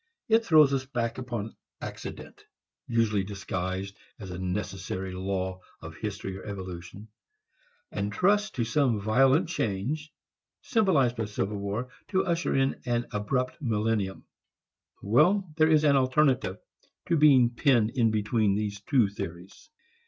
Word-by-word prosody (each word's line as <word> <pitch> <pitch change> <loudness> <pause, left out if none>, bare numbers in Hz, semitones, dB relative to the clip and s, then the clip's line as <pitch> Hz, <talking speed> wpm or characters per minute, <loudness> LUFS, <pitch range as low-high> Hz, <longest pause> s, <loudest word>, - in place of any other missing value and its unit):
It 225 +1 +4
throws 155 -8 +5
us 135 -1 0
back 120 -2 -3
upon 120 -4 -5 0.2
accident, - - -8 0.4
usually 110 -4 +1
disguised 95 -1 -4 0.2
as 95 -4 -8
a 90 - -6
necessary 95 0 -4
law 95 0 -3 0.2
of 80 -1 -9
history 100 +1 -5
or - - -11
evolution, 95 0 -8 0.8
and 100 +1 -2
trusts 205 - +2
to 120 - -1
some 120 -1 +1
violent 135 - +3
change, 150 - -2 0.5
symbolized 150 - +2
by 110 - -1
civil 105 0 -3
war, 105 +6 -3 0.2
to 190 -2 +1
usher 170 -1 0
in 135 0 +1
an 120 0 -1
abrupt 125 +8 -2
millennium. 110 -5 -1 0.8
There 155 - +3
is 155 -1 +4
an 145 -2 +5
alternative 130 -6 +2 0.5
to 170 - +1
being 135 -6 +6
penned 120 -3 +2
in 120 -4 +2
between 105 -1 +1
these 105 -1 -3
two 130 -5 +3
theories. 95 - -8
115 Hz, 130 wpm, -28 LUFS, 100-140 Hz, 0.8 s, being